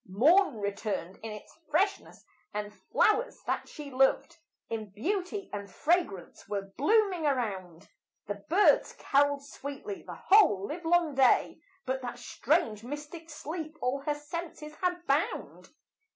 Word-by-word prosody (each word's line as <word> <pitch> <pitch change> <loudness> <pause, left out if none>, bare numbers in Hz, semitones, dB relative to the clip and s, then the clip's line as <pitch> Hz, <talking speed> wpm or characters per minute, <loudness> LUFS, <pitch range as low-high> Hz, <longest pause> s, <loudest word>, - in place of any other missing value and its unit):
Morn 295 - +4
returned 200 -3 -3
in 225 - -6
its 210 -1 -10
freshness, 390 +6 0 0.3
and 210 0 -3
flowers 430 - +1
that - - -2
she 295 -3 -8
loved 270 +5 +2 0.3
In 220 -2 -4
beauty 370 - -2
and 200 -1 -5
fragrance 250 - -1
were 195 -1 -4
blooming 375 - +3
around; 195 - -2 0.4
The 205 -1 -5
birds 390 +6 +4
caroled 285 0 +2
sweetly 285 +9 -7
the - - -9
whole 355 - +5
live 330 - -6
long 335 -2 +3
day, 265 -2 +3 0.3
But 260 0 -1
that 245 -1 -5
strange 240 -3 0
mystic 295 +5 -7
sleep 315 +1 -6
all 255 +2 0
her 295 +1 -1
senses 305 +1 -7
had 360 -1 -1
bound. 285 +2 -1
285 Hz, 135 wpm, -30 LUFS, 215-340 Hz, 0.4 s, whole